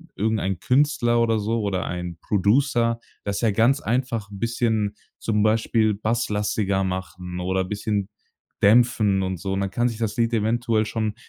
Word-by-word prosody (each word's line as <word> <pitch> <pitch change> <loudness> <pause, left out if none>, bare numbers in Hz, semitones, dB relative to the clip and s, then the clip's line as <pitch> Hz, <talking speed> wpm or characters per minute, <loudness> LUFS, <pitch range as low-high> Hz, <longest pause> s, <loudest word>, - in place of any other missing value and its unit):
irgendein 105 -4 -1
Künstler 125 - +2
oder 115 -1 +2
so 110 +2 -1
oder 95 -3 -1
ein 90 -1 -5
Producer 115 +3 +2 0.2
das 100 -1 -2
ja 115 - +3
ganz 120 +7 +3
einfach 115 -3 -1
'n 100 - -9
bisschen 110 -2 0 0.2
zum 105 -2 0
Beispiel 110 0 +2
basslastiger 105 -2 0
machen 90 -1 -5
oder 95 +1 0
bisschen 100 +1 -2 0.5
dämpfen 105 -3 +4
und 95 -1 -2
so. 95 +1 -3
Und 95 - -1
dann 100 -1 -2
kann 120 +4 +1
sich 115 - -4
das 110 -2 -2
Lied 115 0 +1
eventuell 115 0 +1
schon 110 -1 -2
110 Hz, 160 wpm, -23 LUFS, 100-115 Hz, 0.5 s, dämpfen